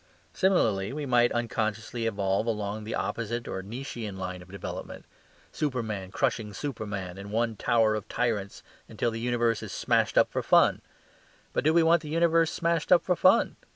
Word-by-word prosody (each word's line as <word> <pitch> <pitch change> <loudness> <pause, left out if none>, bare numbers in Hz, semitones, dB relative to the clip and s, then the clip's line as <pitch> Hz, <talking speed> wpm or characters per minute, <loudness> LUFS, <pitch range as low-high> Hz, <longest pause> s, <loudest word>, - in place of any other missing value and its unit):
Similarly, 110 - +2
we 150 0 -4
might 120 -2 +3
unconsciously 115 0 -2
evolve 100 0 0
along 105 -1 -2
the 110 - -3
opposite 115 +4 -3
or 95 - -4
Nietzschian 110 -1 -6
line 95 -1 -5
of 90 - -15
development 100 -1 -7 0.5
superman 110 -10 -3
crushing 110 -2 -1
superman 105 -9 -5
in 100 +1 -8
one 115 +1 0
tower 110 0 +2
of 110 -1 -4
tyrants 105 -5 -2 0.3
until 120 - -1
the 115 - -5
universe 120 -1 +1
is - - -7
smashed - - +1
up - - +5
for - - -1
fun. - - +4 0.7
But - - 0
do 155 - +4
we 170 0 +4
want 165 0 +4
the 155 - -8
universe 165 0 +3
smashed 170 -1 -1
up 180 - +6
for 180 - +1
fun? 185 +7 +4
115 Hz, 170 wpm, -28 LUFS, 105-135 Hz, 0.7 s, up